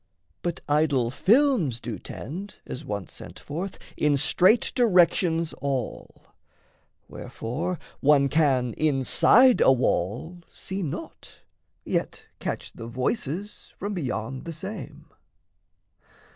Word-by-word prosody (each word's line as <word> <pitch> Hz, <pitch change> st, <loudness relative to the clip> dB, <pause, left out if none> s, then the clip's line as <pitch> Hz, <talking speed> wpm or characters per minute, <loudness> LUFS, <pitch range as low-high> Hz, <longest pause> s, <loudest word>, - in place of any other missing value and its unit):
But 175 Hz, -1 st, -3 dB
idol 145 Hz, -5 st, +2 dB
films 215 Hz, -, +3 dB
do 120 Hz, -2 st, -6 dB
tend, 185 Hz, -, -7 dB
As 135 Hz, -, -7 dB
once 100 Hz, -, -5 dB
sent -, -, -10 dB
forth, 175 Hz, +7 st, -5 dB, 0.2 s
in 150 Hz, -1 st, +2 dB
straight 185 Hz, -, +3 dB
directions 175 Hz, -6 st, +3 dB
all; 135 Hz, -4 st, -4 dB, 0.8 s
Wherefore 165 Hz, +11 st, -4 dB, 0.2 s
one 140 Hz, -1 st, +4 dB
can 135 Hz, -6 st, +2 dB
inside 155 Hz, -, +5 dB
a -, -, +7 dB
wall 125 Hz, -, 0 dB
see 190 Hz, +1 st, -6 dB
naught, 155 Hz, -6 st, -7 dB, 0.4 s
Yet -, -, -2 dB, 0.2 s
catch -, -, -4 dB
the 115 Hz, -, -8 dB
voices 145 Hz, -, -3 dB
from 205 Hz, +1 st, -4 dB
beyond 130 Hz, -, -4 dB
the 165 Hz, -, -5 dB
same. 190 Hz, +7 st, -8 dB
150 Hz, 105 wpm, -26 LUFS, 130-185 Hz, 0.8 s, a